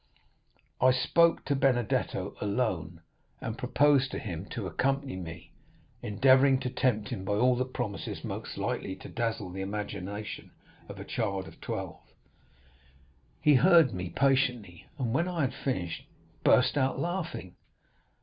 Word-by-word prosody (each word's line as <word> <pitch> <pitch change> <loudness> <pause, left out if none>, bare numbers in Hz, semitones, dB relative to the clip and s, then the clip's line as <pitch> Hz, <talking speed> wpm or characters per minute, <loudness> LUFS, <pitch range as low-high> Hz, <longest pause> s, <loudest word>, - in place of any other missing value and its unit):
I 130 - +7
spoke 170 +6 +3
to 140 - +1
Benedetto 125 -4 0
alone, 100 -6 -1 0.4
and 110 - -4
proposed 135 +2 +3
to - - -5
him 90 -3 -5
to 110 -1 -5
accompany 135 +4 -1
me, 85 -3 -8 0.5
endeavoring 130 +5 +4
to 125 - -2
tempt 110 -5 0
him 115 -8 -4
by 100 - -1
all 125 +4 +4
the 130 +1 0
promises 105 -6 -5
most - - -5
likely 95 - -2
to 130 - -11
dazzle 115 -6 -2
the 95 +1 -5
imagination 100 +1 -5 0.4
of - - -8
a - - -7
child 100 -4 -2
of - - -14
twelve. - - -5 1.4
He 150 - +5
heard 165 -2 +6
me 90 -1 -4
patiently, 125 -6 0
and 120 -5 -1
when 170 +6 +1
I 175 -3 -2
had 130 - 0
finished, 90 -11 -3 0.4
burst - - +4
out 135 0 +1
laughing. 175 - -3
120 Hz, 140 wpm, -29 LUFS, 100-135 Hz, 1.4 s, I